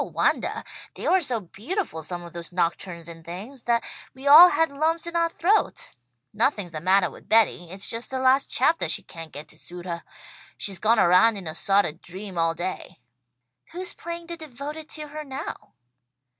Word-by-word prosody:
"No - - -3
wondah! - - 0 0.3
They - - -4
were 375 - +4
so 250 -7 -1
beautiful, 210 - -4
some 175 +3 -6
of 170 - -11
those 170 0 -7
nocturnes 170 -1 -2
and 165 -1 -11
things, 200 +11 -8
that 235 -1 +2 0.3
we 265 +1 -11
all 315 +6 +11
had 325 -3 +2
lumps 320 +4 0
in 340 0 -5
our 335 0 +3
throats. 365 +6 0 0.4
Nothing's 210 -4 0
the 155 -1 -6
mattah 185 0 +3
with - - -15
Betty. 215 -6 +3
It's 190 +2 -3
just 230 +1 -3
the 265 - -3
last 260 +1 +3
chaptah 320 +6 +2
she 200 - -1
can't 165 -3 -9
get 145 +2 -8
to 155 - -15
suit 175 0 -10
her. 170 -2 -4 0.6
She's 195 -3 0
gone 225 +4 +3
around 190 +4 +5
in 190 - -8
a 155 - -4
sawt 195 +4 +2
of 160 +3 -6
dream 190 +2 -8
all 165 0 +2
day." 185 +2 -5 0.8
"Who's 360 +1 -1
playing 340 0 -6
the 340 0 -6
devoted 305 +1 -7
to 305 -1 -6
her 305 +1 -6
now?" 270 -2 -7
215 Hz, 195 wpm, -25 LUFS, -, 0.8 s, all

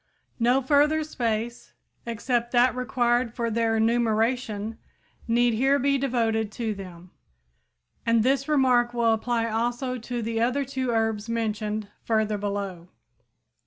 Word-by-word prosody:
No 250 +3 +3
further 300 +3 +3
space 235 -5 -3 0.3
except 235 +1 -1
that 245 +1 +4
required 240 -1 0
for 235 -2 -1
their 225 0 +1
enumeration 225 -1 0 0.5
need 240 +1 +3
here 270 +5 +3
be 275 +1 +1
devoted 225 -5 0
to 225 -1 -2
them. 180 -3 -11 0.9
And 230 -1 +3
this 275 +3 +1
remark 250 -4 +3
will 230 -1 +3
apply 230 +1 0
also 240 +3 -2
to 240 +1 -4
the 225 0 -1
other 255 +4 +1
two 260 -1 -3
herbs 225 -1 0
mentioned 215 -2 -2
further 215 -2 0
below. 200 -4 -4
235 Hz, 125 wpm, -25 LUFS, 220-250 Hz, 0.9 s, that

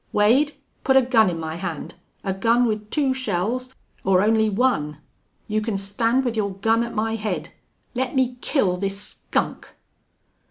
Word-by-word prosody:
Wade, 255 +9 +4 0.3
put 265 -1 +4
a 265 - +6
gun 230 -5 +4
in 170 -2 -3
my 160 0 -4
hand 170 -4 -5 0.3
a 195 - -1
gun 230 +5 +3
with 210 -2 -2
two 275 -1 +1
shells 250 +1 -2 0.3
or 190 0 +4
only 220 0 +3
one. 195 - +1 0.5
You 215 -1 0
can 215 -2 -1
stand 225 +6 +1
with 240 -2 -1
your 200 -3 -1
gun 225 +4 +2
at 235 - -6
my 225 +1 0
head.... 185 -7 -3 0.4
Let 255 +2 -2
me 255 -1 +1
kill 190 - +1
this 195 +1 -2
skunk!" - - -3
220 Hz, 165 wpm, -23 LUFS, 195-245 Hz, 0.5 s, a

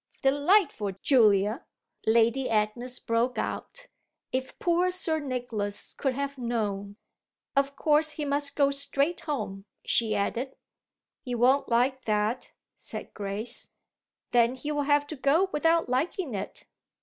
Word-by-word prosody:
"Delightful 285 - +3
Julia!" 215 - +4 0.4
Lady 235 +4 +3
Agnes 225 +4 -1
broke 230 +2 0
out. - - -4 0.5
"If 260 0 -3
poor 350 +1 +2
Sir 330 -3 +1
Nicholas 240 -7 -4
could 265 -3 -1
have 280 0 -3
known! 205 -4 -2 0.6
Of 275 0 +1
course 305 0 +3
he 295 0 -4
must 285 0 0
go 280 -2 +3
straight 280 +3 0
home," 210 -10 -4 0.2
she 220 -2 +2
added. 235 +6 -2 0.7
"He 250 -2 -4
won't 255 +4 +3
like 255 +3 +1
that," 215 +3 0 0.2
said - - -8
Grace. 210 +4 -2 0.6
"Then 240 +1 +4
he'll 295 +3 -2
have 290 0 +2
to 310 - -7
go 305 +8 +2
without 330 +2 +2
liking 275 - -1
it." 200 0 -6
260 Hz, 125 wpm, -28 LUFS, 225-290 Hz, 0.7 s, Julia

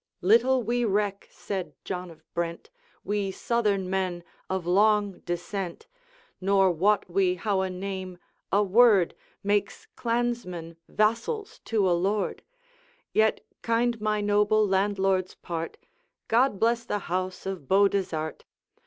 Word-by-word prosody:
'Little 240 +6 +4
we 240 +2 0
reck,' 205 -2 0
said 190 -3 -5
John 180 -1 -4
of 165 - -15
Brent, 170 0 -4 0.3
'We 205 0 -1
Southern 210 -5 0
men, 185 -2 -2 0.3
of 190 -2 -2
long 205 +2 +3
descent; 175 +1 -4 0.6
Nor 195 0 +4
wot 195 +5 +2
we 180 0 +2
how 195 +1 0
a 190 - -1
name 185 -1 -5 0.3
a 205 +2 +4
word 205 -2 +5 0.3
Makes 205 0 0
clansmen 230 -9 -2
vassals 315 - 0
to 210 -4 +1
a 180 - +3
lord: 195 +4 0 0.7
Yet 220 0 +2 0.2
kind 230 0 +1
my 215 -1 0
noble 210 +1 +3
landlord's 190 -1 +1
part, 165 -1 -5 0.5
God 235 -3 +3
bless 230 +1 +2
the 215 - -2
house 185 +1 -3
of 190 -8 -5
Beaudesert! 190 -5 +1
200 Hz, 125 wpm, -27 LUFS, 185-215 Hz, 0.7 s, word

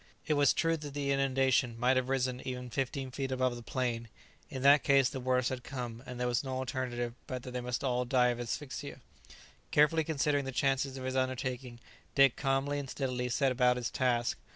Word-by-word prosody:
It 155 - +1
was 145 -1 +4
true 165 0 +1
that 145 -2 -8
the 140 -1 -1
inundation 135 -3 +2
might 125 +2 +3
have 130 0 0
risen 130 -1 0
even 125 -1 -5
fifteen 135 0 -2
feet 135 +1 -3
above 130 -1 +1
the 120 - -8
plain; 120 -1 -2 0.4
in 130 - -5
that 140 +1 +7
case 135 -2 +4
the 135 - -5
worst 125 0 +1
had 130 -1 -5
come, 120 -4 -6
and 125 -1 -7
there 125 - 0
was 120 +1 0
no 130 -1 -3
alternative 125 -2 -3
but 125 -2 -5
that 125 - -7
they 125 0 -3
must 125 +1 -3
all 125 -2 +1
die 125 0 +3
of 120 0 -2
asphyxia. 125 +3 -5 0.7
Carefully 150 +2 +4
considering 145 -2 0
the 135 - -3
chances 135 0 0
of 130 - -6
his 130 0 -3
undertaking, 130 -1 -2 0.4
Dick 135 -3 +6
calmly 140 +1 0
and 140 -2 -6
steadily 125 -2 -2
set 135 +2 +2
about 125 0 +3
his 125 -1 -3
task. 120 -2 0
130 Hz, 205 wpm, -32 LUFS, 125-135 Hz, 0.7 s, that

